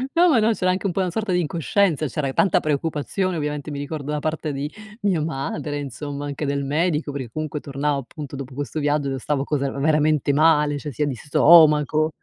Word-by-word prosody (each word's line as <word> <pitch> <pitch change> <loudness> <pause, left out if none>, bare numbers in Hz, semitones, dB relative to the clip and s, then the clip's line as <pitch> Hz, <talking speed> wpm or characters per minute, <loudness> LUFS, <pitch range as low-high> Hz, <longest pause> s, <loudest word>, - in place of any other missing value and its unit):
No, 350 +1 +5
ma 255 - +4
no, 220 +1 +3
c'era 185 -3 +1
anche 185 +2 -3
un 190 - +1
po' - - -2
una 180 -2 -1
sorta 215 0 -2
di 180 - +2
incoscienza 165 0 +1
c'era 140 +2 -2
e 135 - -3
tanta 190 - +3
preoccupazione 160 +5 -1
ovviamente, 150 0 -3
mi 145 - -5
ricordo 145 0 -5
da 150 - -1
parte 155 0 -2
di 140 +2 -4 0.3
mia 190 -6 +1
madre, 145 0 -3
insomma 145 +1 -6
anche 145 +1 -4
del 140 0 -1
medico 150 +1 0
perché 130 -4 -5
comunque 155 -1 -4
tornavo 140 0 -2
appunto 140 +1 -8
dopo 135 -1 -7
questo 145 +3 -4
viaggio 145 -1 0
io 135 - -2
stavo 140 +1 -1
così, 145 -1 -1
era 140 - -3
veramente 150 -1 +2
male, 150 -1 +3
cioè 150 0 -6
sia 145 +5 -1
di 140 - -2
stomaco 150 +2 +5
150 Hz, 215 wpm, -22 LUFS, 140-160 Hz, 0.3 s, No